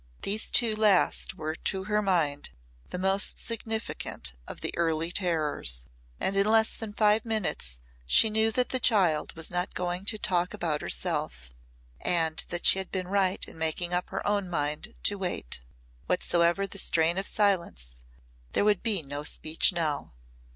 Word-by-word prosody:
These 210 +2 +1
two 230 -3 +2
last 210 -4 +2
were 155 0 -4
to 190 +3 -2
her 210 +2 0
mind 165 -8 0 0.4
the - - -6
most 190 +2 +1
significant 225 - -3
of - - -8
the - - -2
early 165 0 0
terrors. 155 - 0 0.3
And 195 - -1
in 195 +1 +3
less 220 0 +4
than 225 -2 -6
five 210 0 +3
minutes 155 - -2 0.3
she 220 - +6
knew 220 +1 +2
that 250 +1 +1
the 255 - 0
child 185 -11 +3
was 165 +1 -4
not 180 +2 -2
going 180 +1 -3
to 215 +1 +1
talk 180 -3 0
about 155 -3 -2
herself - - -2 0.5
and 160 -2 +2
that 175 - -2
she 190 - +6
had 190 - -6
been 185 -1 -3
right 195 -1 +1
in - - -11
making 160 +2 0
up 180 +1 -1
her 195 - -5
own 205 -2 0
mind 150 -2 -2
to 205 -1 +1
wait. 175 - -3 0.5
Whatsoever 175 +3 +1
the 200 0 -5
strain 170 +2 +2
of 195 - +1
silence, 115 - 0 0.5
there - - +1
would 210 -3 +2
be 210 -8 +1
no 145 +1 -6
speech 155 +3 +2
now. 160 - -3
180 Hz, 165 wpm, -28 LUFS, 160-205 Hz, 0.5 s, she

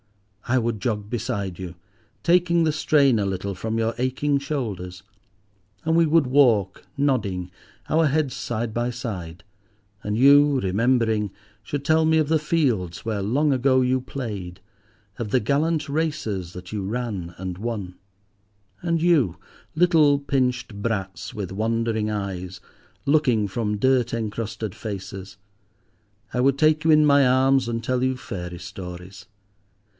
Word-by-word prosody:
I 130 +2 +2
would 115 -4 -1
jog 105 -4 -2
beside 100 -6 -3
you, 90 -2 -6 0.5
taking 170 -1 +3
the 160 - +2
strain 140 -6 +3
a 100 - 0
little 95 0 -3
from 110 +4 -3
your 115 0 0
aching 140 +3 0
shoulders; 105 - -4 0.8
and 160 0 +2
we 165 -1 +4
would 160 -1 +4
walk 120 -8 +3
nodding, 100 -11 0 0.4
our 160 0 +3
heads 145 -2 0
side 115 -1 -3
by 120 +1 -1
side, 95 -8 -6 0.6
and 105 +1 -2
you, 140 +2 +6
remembering, 110 0 +1 0.3
should 140 +5 -4
tell 160 +1 +4
me 160 0 +3
of 155 -2 +2
the 160 +1 +2
fields 125 - 0
where 110 -3 -1
long 140 +9 +2
ago 130 0 +3
you 130 0 +1
played, 105 -9 -6 0.6
of 115 -3 -4
the 130 - +3
gallant 150 +6 0
races 140 - -2
that 90 +2 -10
you 105 -2 -2
ran 100 -5 -4
and 90 -1 -5
won. 105 -5 -4 0.9
And 170 -2 0
you, 145 - +3 0.4
little 160 -4 +4
pinched 125 -6 -1
brats, 95 -6 -3
with 100 -4 -5
wondering 110 +1 -1
eyes, 95 -3 -4 0.5
looking 135 -8 +2
from 105 +1 -2
dirt 125 +1 +2
encrusted 110 -2 -4
faces, 100 -2 -7 1.0
I 125 - +1
would 135 +1 +3
take 155 +1 +3
you 160 - +4
in 155 0 +6
my 140 -1 +5
arms 130 0 +3
and 115 0 -2
tell 125 +1 0
you 130 0 0
fairy 90 -7 -6
stories. 90 +1 -9
120 Hz, 145 wpm, -24 LUFS, 100-140 Hz, 1.0 s, you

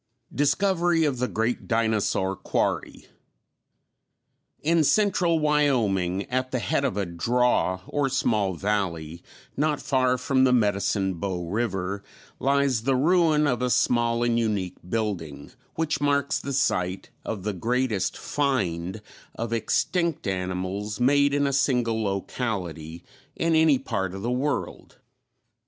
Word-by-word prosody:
Discovery 175 +2 +2
of 135 -4 -1
the 125 - +1
Great 115 +1 -2
Dinosaur 110 -4 +1
Quarry. - - -2 1.6
In 165 +1 +3
central 180 -1 +2
Wyoming, 120 - +1
at 130 +1 -2
the 130 - -1
head 140 +4 0
of 135 -6 -1
a 100 - 0
"draw," 95 +1 +1
or 145 -2 -1
small 105 -7 0
valley, 85 -4 -2 0.3
not 150 +1 0
far 130 -1 +1
from 130 +1 +1
the 130 - +4
Medicine 100 -4 +1
Bow 90 -2 -3
River, 100 -1 -2 0.4
lies 140 -3 +2
the 130 +3 +1
ruin 155 +1 +3
of 125 -3 0
a 125 - +1
small 120 -1 +2
and 120 -1 +2
unique 105 -5 -1
building, 90 -11 -3 0.2
which 160 -2 -1
marks 140 -1 +1
the 140 - -5
site 95 -7 0
of 100 -4 -5
the 105 0 -2
greatest 115 0 -1
"find" 105 - -2 0.3
of 115 0 -3
extinct 170 - 0
animals 95 +2 -3
made 140 +3 +4
in 145 0 +1
a 140 - 0
single 125 -5 +1
locality 95 -5 -4 0.3
in 165 0 +1
any 160 -3 +5
part 95 -7 -3
of 95 - -7
the 120 - -1
world. 130 +2 -3
120 Hz, 130 wpm, -25 LUFS, 95-140 Hz, 1.6 s, any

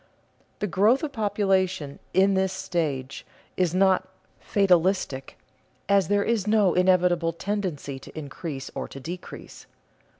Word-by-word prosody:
The - - -2
growth 210 - +3
of 300 - -2
population 190 - 0
in 195 +2 +4
this 190 0 +1
stage 145 -8 -3 0.3
is 180 -2 +1
not 185 0 +3 0.3
"fatalistic," 185 -8 +1 0.5
as 200 -3 +3
there 205 0 +2
is 220 -3 0
no 210 -4 +4
inevitable 180 -2 +3
tendency 170 -8 -3
to 135 - -13
increase 145 -1 -6
or - - -4
to 135 - -10
decrease. 170 +6 -9
185 Hz, 125 wpm, -25 LUFS, 165-200 Hz, 0.5 s, in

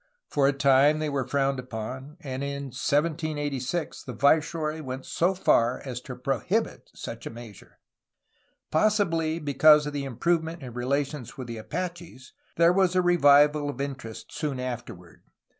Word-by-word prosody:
For 140 -2 +2
a - - +4
time 140 +2 +4
they 155 -1 -2
were 135 -3 -2
frowned 135 0 0
upon, 130 +5 -7
and 135 -2 -5
in 140 0 -4
1786 150 +1 -1
the 125 - -8
viceroy 155 +4 +1
went 130 -2 -6
so 180 +3 +1
far 120 -8 +2
as 125 -2 -5
to 125 0 -8
prohibit 125 -1 -2
such - - -7
a - - -4
measure. 115 -3 -12 0.9
Possibly 165 -4 +2
because 150 0 +5
of 145 - -4
the 140 -1 -3
improvement 165 +4 -1
in 125 -2 -8
relations 135 +1 -2
with 130 - -5
the 115 -1 -6
Apaches, 170 +1 -6 0.2
there 170 +1 +5
was 185 -1 +2
a 185 - +4
revival 150 -3 +5
of 135 - -6
interest 135 -5 -6
soon 145 -5 -3
afterward. 120 -9 -7
140 Hz, 150 wpm, -26 LUFS, 130-155 Hz, 0.9 s, because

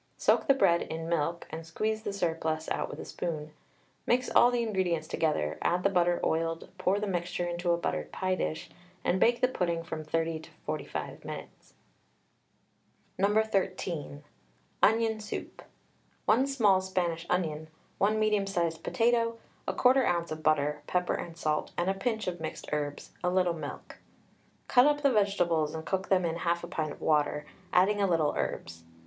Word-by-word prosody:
Soak - - +3
the 275 - +6
bread 170 -10 +4
in 165 0 -5
milk, 170 0 -1
and 160 +1 -5
squeeze 215 +7 -2
the 205 - -3
surplus 160 -4 -1
out - - -1
with - - -8
a - - -6
spoon. 155 -3 -4 0.6
Mix 250 +1 +2
all 240 - +7
the 245 -1 0
ingredients 180 -7 0
together, 80 - 0
add 180 +1 +1
the 195 - +3
butter 175 -1 +3
oiled, 165 0 -1
pour 185 +2 +2
the 210 - -1
mixture 175 -2 -2
into 175 0 -2
a 170 - +3
buttered 170 - -3
pie 185 -1 -1
dish, 160 -3 -3 0.3
and 185 - +1
bake 235 +3 +3
the 255 - +5
pudding 170 -8 -1
from 160 -1 -5
30 165 +1 -1
to 160 - -13 0.2
45 155 0 -4
minutes. - - -9 1.4
No. 205 +3 +4
13. 185 -8 -2 0.6
ONION 220 0 +3
SOUP. 210 -1 -6 0.6
1 255 +5 +4
small 210 -9 +4
Spanish 175 -3 -2
onion, 155 -4 -1 0.3
1 210 +2 +3
medium 210 -2 +2
sized 170 -4 -1
potato, 230 0 +2 0.3
1/4 250 -8 +4
oz. 170 - -14
of 155 0 -4
butter, 150 -1 +2
pepper 180 0 +1
and 170 -1 -5
salt 155 -2 -1
and 175 +2 +2
a - - 0
pinch 220 +2 -2
of 180 -1 -3
mixed 155 - -5
herbs, 145 -1 -3
a 180 - +2
little 180 -1 +2
milk. 165 - -8 0.7
Cut 250 +2 +6
up 295 0 +2
the 280 - +5
vegetables 175 -7 +2
and 160 - -5
cook 190 0 -2
them 185 -2 +3
in 165 0 -1
1/2 170 0 -1
pint 155 -1 -2
of - - -11
water, 150 -1 +1 0.3
adding 200 +3 +4
a 200 - +3
little 165 -4 +2
herbs. 80 +4 -4
175 Hz, 170 wpm, -30 LUFS, 160-205 Hz, 1.4 s, all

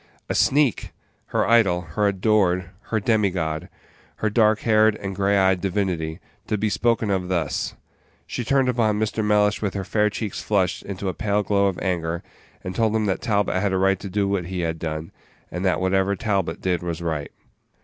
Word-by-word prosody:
A - - -1
sneak! 140 -4 +2 0.3
Her - - 0
idol, 105 -7 +4
her 105 -1 +2
adored, 95 -3 +1 0.2
her 110 - +1
demigod, 95 -8 0 0.5
her 110 - -1
dark 110 0 +3
haired 110 -1 +4
and 100 -2 -5
gray 100 +1 +2
eyed 95 -2 +3
divinity, 90 -4 -1 0.3
to 105 - 0
be 105 +1 0
spoken 115 -2 +1
of 95 -2 0
thus! 85 -6 -1 0.5
She 125 - -4
turned 135 +2 +2
upon 115 -4 +2
Mr. 110 0 -1
Mellish 105 0 +2
with 100 -3 -2
her 100 - -2
fair 105 +1 +2
cheeks 105 -1 -4
flushed 95 -4 0
into 100 0 -5
a 95 - -1
pale 105 +1 0
glow 100 -1 +2
of 95 - -2
anger, 85 -2 -1 0.4
and 90 - -4
told 110 0 +1
him 110 -1 +1
that 95 -2 -1
Talbot 100 -4 +1
had 100 -1 0
a - - +2
right 95 0 +2
to 100 - -7
do 100 +1 0
what 100 -3 -1
he 90 0 -3
had 80 -1 -2
done, 80 0 -4 0.4
and 90 +2 -4
that 95 - +2
whatever 95 +1 +1
Talbot 95 -5 -1
did 90 -2 0
was 85 -1 -4
right. 80 -3 -3
100 Hz, 190 wpm, -23 LUFS, 90-105 Hz, 0.5 s, idol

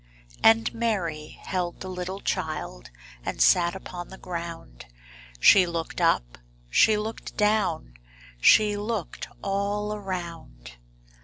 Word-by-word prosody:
And 225 0 +5
Mary 185 -10 -2
held 180 -2 -3
the 190 - -5
little 185 +1 -5
child 155 - -3 0.3
And - - -4
sat 170 - +4
upon 180 -2 -7
the 190 - -10
ground; 170 - -7 0.5
She 185 - +7
looked 165 -1 -4
up, - - +1 0.3
she 215 - +5
looked 220 +2 -6
down, 210 - +1 0.5
She 210 - +5
looked 205 -3 -4 0.2
all 200 +1 -1
around. 170 - -7
185 Hz, 110 wpm, -26 LUFS, 165-210 Hz, 0.5 s, She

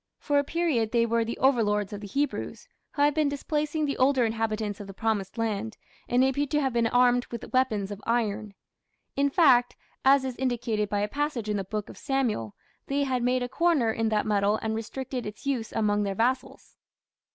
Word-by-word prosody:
For 290 -1 +1
a - - +1
period 285 -9 0
they 235 -1 +3
were 230 0 +1
the 230 +1 -4
overlords 210 -6 +2
of 205 - -6
the 205 - -7
Hebrews, 280 +8 -3 0.3
who 285 - +1
had 290 0 +4
been 305 -1 +2
displacing 300 +2 -1
the 280 - -2
older 260 -1 +4
inhabitants 220 -2 -2
of 205 - -8
the 195 - -10
"Promised 215 -2 -2
Land", 225 -1 -2 0.3
and 245 +1 +4
appear 275 +2 +1
to 295 +2 +1
have 265 -4 0
been 235 -1 +2
armed 245 +1 +3
with 235 - -8
weapons 220 -6 +1
of 205 +1 -7
iron. 215 -3 -1 0.6
In 280 +1 +2
fact, 260 -6 +4 0.3
as 270 0 +5
is 260 -2 -3
indicated 235 -5 -1
by 205 0 0
a 205 - 0
passage 280 -3 -2
in 210 - 0
the 195 - -2
Book 210 +1 -4
of - - -12
Samuel, 235 - -1 0.3
they 280 +1 0
had 260 -2 -1
made 250 +1 +1
a - - -2
"corner" 290 -4 +2
in 225 0 0
that 215 -1 +1
metal 205 0 +2
and 220 0 -1
restricted 250 +3 -4
its 210 +6 -9
use 255 -5 -1
among 210 -2 +1
their 200 -1 -2
vassals. 255 +5 -2
235 Hz, 205 wpm, -27 LUFS, 215-270 Hz, 0.6 s, as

